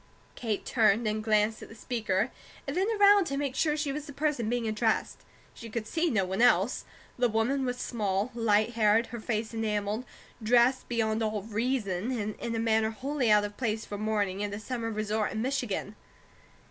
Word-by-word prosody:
Kate 220 -4 -3
turned 225 -1 +3
and 215 0 -1
glanced 215 0 +2
at - - -10
the 225 - -12
speaker, 220 -2 -1 0.3
and - - -4
then 380 +3 +1
around 405 -1 +7
to 275 -4 -3
make 280 -2 -2
sure 300 -1 +1
she 295 -2 -1
was 295 +1 -5
the - - -7
person 280 -7 -1
being 240 -1 -1
addressed. 220 +1 0 0.3
She 230 - -10
could 220 0 -3
see 330 +8 0
no 200 -8 +1
one 190 +4 -2
else. 240 -1 +3 0.3
The 245 -1 +3
woman 240 +5 +1
was 250 0 -2
small, 210 -2 -1
light 220 -1 +2
haired, 225 0 +3
her 235 - -4
face 220 0 -2
enamelled, 215 +1 -1 0.4
dressed 245 +3 +3
beyond 225 -2 0
all 215 -2 -1
reason, 215 -2 -1
and 210 0 -2
in 230 -1 -3
a - - -1
manner 220 -1 +2
wholly 260 +2 -1
out 210 -1 +5
of 205 0 -8
place 220 -3 -1
for 205 - -6
morning 205 -2 -1
at 205 - -2
a - - -6
summer 230 +1 -4
resort 215 0 -1
in 220 - -2
Michigan. 245 -6 -2
225 Hz, 195 wpm, -29 LUFS, 215-245 Hz, 0.4 s, around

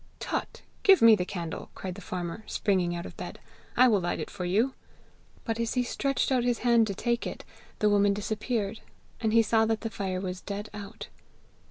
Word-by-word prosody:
'Tut! - - -4 0.2
give 390 -2 +7
me 230 -1 +8
the 180 - -1
candle,' 170 -4 -5
cried 185 -1 -5
the 200 - -10
farmer, 180 +3 -5
springing 185 -4 +1
out 170 - -5
of - - -9
bed; - - -6 0.4
'I 255 +1 +8
will 210 -3 +4
light 175 - -1
it - - -5
for 180 - -4
you!' 220 +9 +2 0.7
But 225 -1 -2
as 230 +1 -1
he 250 - +3
stretched 275 +3 0
out 255 -2 +3
his 245 0 0
hand 235 -2 +5
to 200 - -3
take 235 +3 -1
it, - - -7 0.3
the 210 - +2
woman 205 0 +4
disappeared, 215 0 -2 0.4
and 220 -2 +1
he 230 +1 +6
saw 225 0 +3
that 225 -1 0
the 225 - -3
fire 190 -3 -2
was 185 -1 -4
dead 205 +1 -5
out. 205 +1 -8
210 Hz, 205 wpm, -28 LUFS, 190-230 Hz, 0.7 s, me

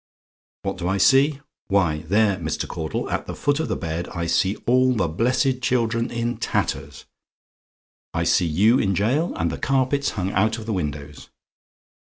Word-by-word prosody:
"WHAT - - -3
DO 90 - -2
I 95 +1 +1
SEE? 135 +7 +4 0.3
"Why, 90 -6 +2
there, 100 +5 +2
Mr. 80 -3 -3
Caudle, 80 -2 -4
at - - -2
the - - -5
foot 145 +1 0
of 160 - -1
the - - -1
bed, 80 +2 -4
I 85 -1 -4
see 95 +4 +1
all 130 +1 +3
the 95 -6 +1
blessed 125 - 0
children 115 -2 0
in 120 +1 -2
tatters 75 +1 -3 1.1
I - - -1
see 85 - +2
you 105 +10 +3
in 100 -1 +1
a - - -2
gaol, 130 - 0
and 85 0 0
the - - -5
carpets 135 +1 +1
hung 95 0 -1
out 110 +4 +1
of 110 - -8
the 110 - -2
windows. 75 -4 -5
105 Hz, 180 wpm, -23 LUFS, 85-125 Hz, 1.1 s, SEE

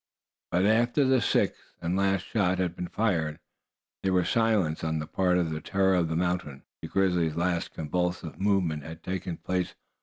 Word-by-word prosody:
But 90 +2 +2
after 120 +6 +3
the 130 -1 +4
sixth - - 0
and 85 +2 -1
last 95 -1 +1
shot 95 -4 +1
had 90 -2 -1
been 90 - -4
fired, 85 -9 0 0.6
there 95 -1 +1
was 90 -2 +2
silence 105 -10 +2
on 80 0 0
the 75 - -3
part 90 +2 +1
of 85 -3 0
the 80 0 -3
terror 95 +3 +2
of 85 -3 +2
the 80 - -1
mountain 85 -5 -1
gulches. - - -53
The - - -5
grizzly's 90 -5 +1
last 85 0 -1
convulsive 90 +1 -2
movement 95 -7 +1
had 80 +3 -10
taken 90 -2 -3
place. 90 -1 -2
90 Hz, 185 wpm, -28 LUFS, 80-95 Hz, 0.6 s, the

